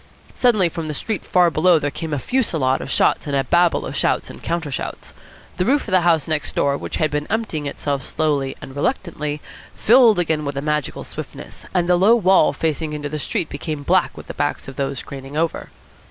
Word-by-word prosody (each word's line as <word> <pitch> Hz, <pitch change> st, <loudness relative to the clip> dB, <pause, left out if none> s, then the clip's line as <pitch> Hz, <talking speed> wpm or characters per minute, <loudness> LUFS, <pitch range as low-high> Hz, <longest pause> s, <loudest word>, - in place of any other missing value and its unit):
Suddenly 215 Hz, -8 st, +3 dB
from 165 Hz, -1 st, -5 dB
the 150 Hz, -, -3 dB
street 215 Hz, +7 st, -3 dB
far 175 Hz, -2 st, +3 dB
below 170 Hz, +2 st, +4 dB
there 145 Hz, -2 st, -1 dB
came 160 Hz, +1 st, -5 dB
a 145 Hz, -, 0 dB
fusillade 155 Hz, -, 0 dB
of -, -, -6 dB
shots -, -, +2 dB
and 140 Hz, -, -1 dB
a 135 Hz, -, +2 dB
babel 175 Hz, +2 st, +2 dB
of -, -, -5 dB
shouts -, -, 0 dB
and -, -, -12 dB
counter 165 Hz, -3 st, -2 dB
shouts. -, -, -5 dB, 0.4 s
The -, -, +1 dB
roof 280 Hz, +2 st, +2 dB
of -, -, -5 dB
the 185 Hz, -1 st, +4 dB
house 165 Hz, -3 st, +2 dB
next 155 Hz, -2 st, -2 dB
door, 140 Hz, 0 st, +2 dB
which -, -, -5 dB
had 155 Hz, -2 st, 0 dB
been 150 Hz, 0 st, -2 dB
emptying 200 Hz, -10 st, -2 dB
itself 140 Hz, -1 st, -3 dB
slowly 145 Hz, -4 st, -1 dB
and 135 Hz, -, -9 dB
reluctantly, 150 Hz, -, -2 dB, 0.3 s
filled 230 Hz, -2 st, +5 dB
again 160 Hz, -3 st, 0 dB
with 140 Hz, -1 st, -4 dB
a -, -, -1 dB
magical 150 Hz, -2 st, -2 dB
swiftness, -, -, -8 dB
and 175 Hz, -2 st, +1 dB
the 180 Hz, 0 st, +4 dB
low 205 Hz, +6 st, +6 dB
wall 190 Hz, -7 st, +4 dB
facing 160 Hz, -1 st, -2 dB
into 150 Hz, -1 st, -4 dB
the 155 Hz, +1 st, -4 dB
street 155 Hz, -, -2 dB
became 145 Hz, 0 st, -5 dB
black 180 Hz, +4 st, +2 dB
with -, -, -9 dB
the -, -, -7 dB
backs 145 Hz, 0 st, -2 dB
of 135 Hz, -, -8 dB
those 135 Hz, -1 st, -3 dB
craning 135 Hz, +1 st, -8 dB
over. 165 Hz, 0 st, -1 dB
155 Hz, 215 wpm, -21 LUFS, 145-180 Hz, 0.4 s, low